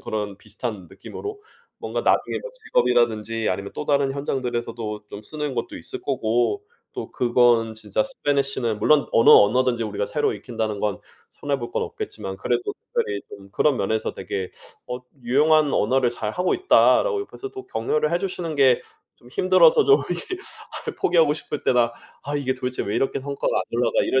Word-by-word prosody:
그런 105 Hz, -2 st, -4 dB
비슷한 105 Hz, -2 st, -6 dB
느낌으로 410 Hz, -, -8 dB, 0.4 s
뭔가 -, -, -3 dB
나중에 -, -, +1 dB
뭐 -, -, -8 dB
직업이라든지 120 Hz, -, +1 dB
아니면 100 Hz, +2 st, -3 dB
또 -, -, -4 dB
다른 140 Hz, -2 st, +2 dB
현장들에서도 120 Hz, -6 st, -3 dB
좀 100 Hz, -, -8 dB
쓰는 150 Hz, +3 st, -4 dB
것도 -, -, -4 dB
있을 -, -, -8 dB
거고 120 Hz, -, 0 dB, 0.3 s
또 -, -, -6 dB
그건 120 Hz, -2 st, +3 dB
진짜 110 Hz, -1 st, -3 dB
spanish는 140 Hz, -, 0 dB
물론 145 Hz, +6 st, +4 dB
어느 115 Hz, -, +5 dB
언어든지 120 Hz, +2 st, +5 dB
우리가 105 Hz, -1 st, -2 dB
새로 150 Hz, -, 0 dB
익힌다는 110 Hz, -4 st, -4 dB
건 105 Hz, -2 st, -1 dB, 0.3 s
손해 140 Hz, -1 st, -3 dB
볼 120 Hz, -, -6 dB
건 -, -, -1 dB
없겠지만 95 Hz, 0 st, -6 dB
그래도 120 Hz, +3 st, -1 dB, 0.2 s
특별히 100 Hz, -1 st, 0 dB
좀 100 Hz, 0 st, -12 dB
그런 140 Hz, +5 st, +2 dB
면에서 110 Hz, +3 st, -1 dB
되게 95 Hz, -2 st, -4 dB, 0.4 s
"어 125 Hz, -, -4 dB, 0.2 s
유용한 150 Hz, +4 st, +3 dB
언어를 130 Hz, -1 st, +2 dB
잘하고 120 Hz, +10 st, -1 dB
있다."라고 410 Hz, +4 st, +4 dB
옆에서 405 Hz, 0 st, -7 dB
또 390 Hz, -1 st, -9 dB
격려를 150 Hz, +7 st, 0 dB
해 170 Hz, -, +2 dB
주시는 175 Hz, -4 st, -3 dB
게 130 Hz, -3 st, +4 dB, 0.4 s
좀 120 Hz, -, -18 dB
힘들어서 185 Hz, -, +5 dB
좀 420 Hz, +1 st, +5 dB
이렇게 -, -, -3 dB, 0.6 s
아휴 -, -, -3 dB
포기하고 165 Hz, -4 st, +3 dB
싶을 150 Hz, -1 st, -5 dB
때나 120 Hz, -2 st, +3 dB, 0.3 s
'아 145 Hz, +1 st, -3 dB
이게 135 Hz, -2 st, 0 dB
도대체 125 Hz, 0 st, -3 dB
왜 100 Hz, -, -3 dB
이렇게 135 Hz, -, 0 dB
성과가 140 Hz, +1 st, -2 dB
안 -, -, +2 dB
올라가.' 120 Hz, +1 st, +2 dB
이럴 130 Hz, -, +2 dB
125 Hz, 395 characters per minute, -23 LUFS, 110-150 Hz, 0.6 s, 어느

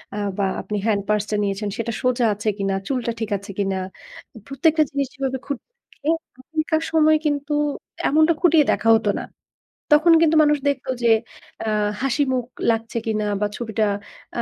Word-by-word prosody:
আ -, -, -4 dB, 0.2 s
বা 200 Hz, -, +1 dB, 0.2 s
আপনি 210 Hz, -, -4 dB
hand 210 Hz, -3 st, +2 dB
purse 210 Hz, -1 st, +2 dB
টা 215 Hz, -, 0 dB
নিয়েছেন, 200 Hz, +1 st, -2 dB
সেটা 230 Hz, -1 st, -2 dB
সোজা 250 Hz, -1 st, +2 dB
আছে 210 Hz, +2 st, -2 dB
কিনা, 195 Hz, -1 st, -1 dB
চুলটা 250 Hz, -3 st, -1 dB
ঠিক 225 Hz, -2 st, -3 dB
আছে 200 Hz, +1 st, -10 dB
কিনা? 195 Hz, -1 st, 0 dB, 0.7 s
প্রত্যেকটা 310 Hz, +3 st, +3 dB
জিনিস 280 Hz, -1 st, -1 dB
যেভাবে 265 Hz, -1 st, -2 dB
খুঁটিয়ে 280 Hz, -, -6 dB, 0.2 s
দেখে। 300 Hz, -, -4 dB, 0.3 s
তখনকার 315 Hz, +4 st, -1 dB
সময় 310 Hz, -1 st, +5 dB
কিন্তু 290 Hz, 0 st, -1 dB, 0.6 s
এমনটা 315 Hz, +3 st, +4 dB
খুঁটিয়ে 325 Hz, -4 st, +5 dB
দেখা 225 Hz, -, +1 dB
হত 220 Hz, -, -4 dB
না। -, -, -5 dB, 0.7 s
তখন 315 Hz, +3 st, +6 dB
কিন্তু 320 Hz, -1 st, +4 dB
মানুষ 295 Hz, 0 st, +3 dB
দেখতো 275 Hz, -1 st, -3 dB
যে, 230 Hz, -, +5 dB, 0.5 s
আ -, -, -3 dB, 0.3 s
হাসিমুখ 260 Hz, -2 st, 0 dB, 0.3 s
লাগছে 225 Hz, +1 st, -3 dB
কিনা 215 Hz, -1 st, -1 dB, 0.2 s
বা 210 Hz, -, +2 dB
ছবিটা 220 Hz, -2 st, -1 dB, 0.5 s
আ -, -, +2 dB
255 Hz, 165 wpm, -22 LUFS, 215-295 Hz, 0.7 s, তখন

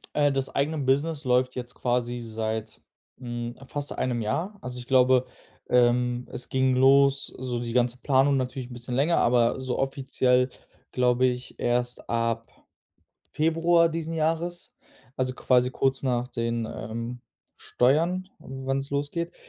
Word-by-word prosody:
Äh, 145 Hz, -1 st, +3 dB
das 135 Hz, -1 st, -1 dB
eigene 150 Hz, +3 st, 0 dB
Business 145 Hz, +3 st, 0 dB
läuft 125 Hz, 0 st, +2 dB
jetzt 125 Hz, -1 st, -6 dB
quasi 120 Hz, 0 st, -1 dB
seit, 110 Hz, -1 st, -4 dB, 0.4 s
hm, 120 Hz, -1 st, -5 dB
fast 145 Hz, +2 st, -4 dB
einem 120 Hz, -2 st, -1 dB
Jahr. 175 Hz, -, -2 dB
Also, 125 Hz, 0 st, -6 dB
ich 120 Hz, -, -8 dB
glaube, 130 Hz, -1 st, +4 dB, 0.4 s
ähm, 125 Hz, 0 st, +2 dB
es 125 Hz, -, -3 dB
ging 130 Hz, 0 st, +2 dB
los 135 Hz, +1 st, +5 dB
so 125 Hz, -2 st, -3 dB
die 120 Hz, -1 st, -4 dB
ganze 125 Hz, 0 st, +1 dB
Planung 135 Hz, +1 st, +3 dB
natürlich 130 Hz, -1 st, -3 dB
'n -, -, -9 dB
bisschen 120 Hz, +1 st, -6 dB
länger, 150 Hz, +6 st, +2 dB
aber 120 Hz, +1 st, +3 dB
so 130 Hz, -1 st, -3 dB
offiziell, 130 Hz, -2 st, +1 dB, 0.4 s
glaube 125 Hz, 0 st, +3 dB
ich 125 Hz, 0 st, -4 dB
erst 120 Hz, 0 st, -1 dB
ab 115 Hz, -1 st, -1 dB, 0.8 s
Februar 165 Hz, +2 st, +3 dB
diesen 165 Hz, 0 st, -4 dB
Jahres, 165 Hz, +2 st, -2 dB, 0.4 s
also, 130 Hz, 0 st, 0 dB
quasi 125 Hz, -1 st, +2 dB
kurz 135 Hz, 0 st, 0 dB
nach 125 Hz, -2 st, 0 dB
den, 115 Hz, -2 st, -2 dB
ähm, 115 Hz, +2 st, -5 dB, 0.4 s
Steuern, 170 Hz, +9 st, +1 dB
wann's 135 Hz, +1 st, -4 dB
losgeht. 145 Hz, +5 st, -2 dB
130 Hz, 140 wpm, -26 LUFS, 120-140 Hz, 0.8 s, los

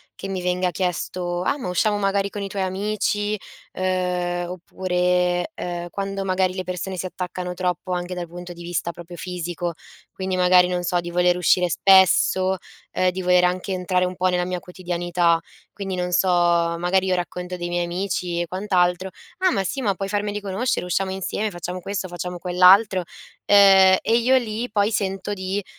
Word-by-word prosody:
che -, -, -7 dB
mi 190 Hz, -1 st, -3 dB
venga 180 Hz, 0 st, 0 dB
chiesto: 180 Hz, 0 st, -2 dB
"Ah, 280 Hz, -, 0 dB
ma 210 Hz, -, -4 dB
usciamo, 205 Hz, +4 st, +1 dB
magari, 195 Hz, 0 st, +1 dB
con 205 Hz, -, -5 dB
i 200 Hz, -, -3 dB
tuoi 195 Hz, 0 st, -2 dB
amici," 205 Hz, +2 st, -1 dB, 0.4 s
uhm, 180 Hz, -1 st, -1 dB
oppure, 180 Hz, -, 0 dB
uhm, 175 Hz, 0 st, -5 dB
quando 195 Hz, 0 st, -3 dB
magari 185 Hz, -1 st, +1 dB
le 185 Hz, -, -3 dB
persone 185 Hz, +1 st, -4 dB
si 185 Hz, -, -3 dB
attaccano 180 Hz, 0 st, -5 dB
troppo 180 Hz, 0 st, -2 dB
anche 180 Hz, 0 st, -3 dB
dal 175 Hz, -1 st, -5 dB
punto 175 Hz, +1 st, -9 dB
di 175 Hz, 0 st, -10 dB
vista 170 Hz, 0 st, -2 dB
proprio 175 Hz, +1 st, -11 dB
fisico 175 Hz, -1 st, -4 dB, 0.4 s
quindi, 190 Hz, -1 st, -3 dB
magari, 180 Hz, 0 st, +5 dB
non 180 Hz, 0 st, -1 dB
so 175 Hz, +1 st, +1 dB
di 175 Hz, 0 st, -5 dB
voler 180 Hz, 0 st, +3 dB
uscire 180 Hz, 0 st, +3 dB
spesso, 190 Hz, +1 st, +4 dB, 0.4 s
uhm, 185 Hz, -, +2 dB
di 185 Hz, +1 st, -5 dB
voler 180 Hz, 0 st, +4 dB
anche 180 Hz, +2 st, -1 dB
entrare 180 Hz, 0 st, 0 dB
un 180 Hz, 0 st, -4 dB
pò 185 Hz, 0 st, +2 dB
nella 180 Hz, -1 st, +1 dB
mia 180 Hz, 0 st, -3 dB
quotidianità, 175 Hz, -2 st, 0 dB, 0.3 s
quindi 195 Hz, -2 st, -5 dB
non 180 Hz, 0 st, -2 dB
so, 185 Hz, +2 st, +2 dB
magari 175 Hz, +1 st, +2 dB
io 185 Hz, -1 st, +1 dB
racconto 180 Hz, 0 st, -4 dB
dei 175 Hz, 0 st, -4 dB
miei 175 Hz, 0 st, 0 dB
amici 175 Hz, -1 st, -2 dB
e 175 Hz, -, -3 dB
quant'altro: 185 Hz, 0 st, 0 dB, 0.3 s
"Ah, 370 Hz, -1 st, +2 dB
ma 195 Hz, -, 0 dB
sì! 270 Hz, +8 st, -3 dB
Ma 205 Hz, -5 st, +1 dB
puoi 195 Hz, +1 st, -4 dB
farmeli 205 Hz, 0 st, -2 dB
conoscere, 200 Hz, +3 st, -1 dB
usciamo 190 Hz, +2 st, -1 dB
insieme, 195 Hz, +3 st, -2 dB
facciamo 180 Hz, -1 st, -6 dB
questo, 190 Hz, 0 st, -4 dB
facciamo 175 Hz, +1 st, -5 dB
quell'altro," 185 Hz, +3 st, +5 dB, 0.5 s
uhm, 195 Hz, -2 st, +7 dB
e 225 Hz, +1 st, +2 dB
io 245 Hz, +3 st, +3 dB
lì 235 Hz, 0 st, -3 dB
poi 205 Hz, +1 st, +1 dB
sento 195 Hz, -1 st, -2 dB
di 190 Hz, +1 st, -3 dB
180 Hz, 180 wpm, -23 LUFS, 180-195 Hz, 0.5 s, uhm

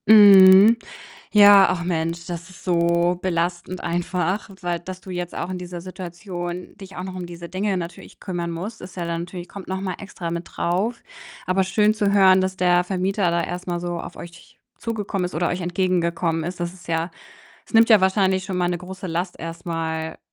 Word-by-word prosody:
Mhm. 200 Hz, 0 st, +9 dB, 0.6 s
Ja, 205 Hz, -2 st, +8 dB
ach 175 Hz, -1 st, -2 dB
Mensch, 170 Hz, -1 st, -2 dB
das 170 Hz, 0 st, -6 dB
ist 185 Hz, -, -15 dB
so 170 Hz, 0 st, +2 dB
belastend 175 Hz, 0 st, -2 dB
einfach, 175 Hz, +3 st, -2 dB
weil 175 Hz, -1 st, -2 dB
dass 185 Hz, +2 st, -9 dB
du -, -, -16 dB
jetzt 175 Hz, -1 st, -4 dB
auch 170 Hz, -, -4 dB
in 185 Hz, -, -4 dB
dieser 180 Hz, -1 st, -7 dB
Situation 175 Hz, 0 st, -7 dB
dich 195 Hz, -2 st, -12 dB
auch -, -, -4 dB
noch 185 Hz, 0 st, -6 dB
um 185 Hz, -1 st, -5 dB
diese 170 Hz, 0 st, -9 dB
Dinge 195 Hz, +3 st, -1 dB
natürlich 170 Hz, 0 st, -9 dB
kümmern 175 Hz, -3 st, -4 dB
musst, 190 Hz, +7 st, -6 dB
ist 180 Hz, -, -10 dB
ja 175 Hz, -2 st, -3 dB
dann 170 Hz, 0 st, -2 dB
natürlich 175 Hz, 0 st, -8 dB
kommt 200 Hz, -2 st, -10 dB
noch 190 Hz, 0 st, -3 dB
mal 190 Hz, -2 st, -3 dB
extra 185 Hz, -4 st, -6 dB
mit 170 Hz, +1 st, -4 dB
drauf. 200 Hz, +7 st, -1 dB, 0.5 s
Aber 190 Hz, +1 st, +2 dB
schön 210 Hz, +3 st, +2 dB
zu 205 Hz, -2 st, +1 dB
hören, 190 Hz, -2 st, +6 dB
dass 185 Hz, 0 st, -2 dB
der 180 Hz, 0 st, +3 dB
Vermieter 190 Hz, 0 st, 0 dB
da 170 Hz, 0 st, +1 dB
erst 180 Hz, +1 st, -5 dB
mal 175 Hz, -1 st, -2 dB
so 175 Hz, 0 st, -3 dB
auf -, -, -8 dB
euch 175 Hz, 0 st, -12 dB, 0.2 s
zugekommen 205 Hz, -5 st, -3 dB
ist 180 Hz, -, -4 dB
oder 170 Hz, +2 st, 0 dB
euch 180 Hz, +1 st, -3 dB
entgegengekommen 170 Hz, -2 st, 0 dB
ist. 175 Hz, +1 st, -5 dB
Das 175 Hz, +1 st, -3 dB
ist 180 Hz, -, -16 dB
ja 165 Hz, +1 st, -1 dB, 0.5 s
es -, -, -19 dB
nimmt 225 Hz, 0 st, +6 dB
ja 215 Hz, -4 st, +7 dB
wahrscheinlich 190 Hz, 0 st, +2 dB
schon 190 Hz, -1 st, -4 dB
mal 175 Hz, -1 st, +1 dB
'ne 175 Hz, -, -1 dB
große 185 Hz, +1 st, -8 dB
Last 175 Hz, +2 st, -3 dB
erst 165 Hz, +1 st, -7 dB
mal. 160 Hz, -1 st, -3 dB
180 Hz, 205 wpm, -22 LUFS, 170-190 Hz, 0.6 s, Mhm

